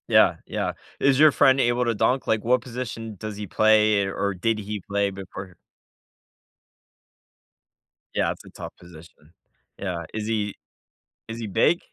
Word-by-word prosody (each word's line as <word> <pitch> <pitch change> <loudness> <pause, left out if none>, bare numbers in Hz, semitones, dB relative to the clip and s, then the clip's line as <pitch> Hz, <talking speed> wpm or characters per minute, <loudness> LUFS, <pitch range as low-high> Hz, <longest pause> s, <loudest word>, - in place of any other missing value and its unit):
Yeah, - - +5
yeah. - - -2 0.3
Is 135 -1 +3
your 155 0 +8
friend 135 -1 +4
able 120 0 +2
to 115 -1 +1
dunk? 130 +5 +1
Like, 110 -2 +1
what 125 +1 +3
position 115 -3 -6
does 110 -1 -6
he 105 -1 -5
play, 110 0 +4
or 100 +1 -1
did 110 +4 0
he 105 0 -4
play 100 0 +1
before 95 -1 -9 2.6
Yeah, - - +1
it's - - -9
a - - -12
tough - - -9
position. 85 -2 -16 0.5
Yeah. 90 -4 -3
Is 110 -1 -3
he 105 -3 -1 0.7
is 115 +1 -6
he 115 - -4
big? 165 - +3
110 Hz, 150 wpm, -24 LUFS, 100-120 Hz, 2.6 s, your